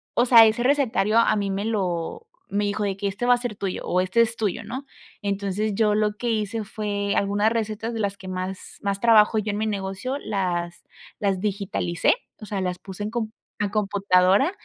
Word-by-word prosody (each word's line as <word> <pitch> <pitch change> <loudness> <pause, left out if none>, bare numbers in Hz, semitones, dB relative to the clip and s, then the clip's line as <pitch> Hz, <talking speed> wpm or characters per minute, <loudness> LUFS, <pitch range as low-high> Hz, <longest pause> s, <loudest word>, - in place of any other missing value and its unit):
o 240 - +4
sea, 230 -2 +9
ese 220 +2 +2
recetario 250 -6 +2
a 230 -2 +4
mí 200 -1 -1
me 195 +1 -2
lo 190 - -2 0.3
me 205 0 +1
dijo 205 +1 -1
de 195 -1 -1
que: 200 - -2
"Este 200 +5 -3
va 245 - +6
a - - -3
ser 240 -4 -4
tuyo, 195 -2 -3
o 180 - +1
este 185 +5 0
es 230 0 +3
tuyo", 220 0 -2
¿no? 260 +5 -6 0.4
Entonces, 200 +1 -1
yo 210 0 +2
lo 210 -1 0
que 240 - -2
hice, 215 0 -1
fue 205 -1 -2
algunas 205 +2 +2
recetas 225 0 -2
de 225 - -3
las 200 -1 -1
que 185 - -11
más 185 +1 -5
más 200 -1 -1
trabajo 220 -1 +5
yo 215 0 0
en 205 - -3
mi 220 0 -1
negocio, 200 +6 -3
las 175 -7 -3 0.4
las 195 -2 0
digitalicé, 195 -4 0 0.3
o - - -7
sea, 200 -1 -3
las 180 -1 -2
puse 190 +2 -8
en 210 - -2
com 225 -2 -2 0.3
a 205 -1 -1
computadora, 200 - +3
205 Hz, 210 wpm, -24 LUFS, 195-220 Hz, 0.4 s, sea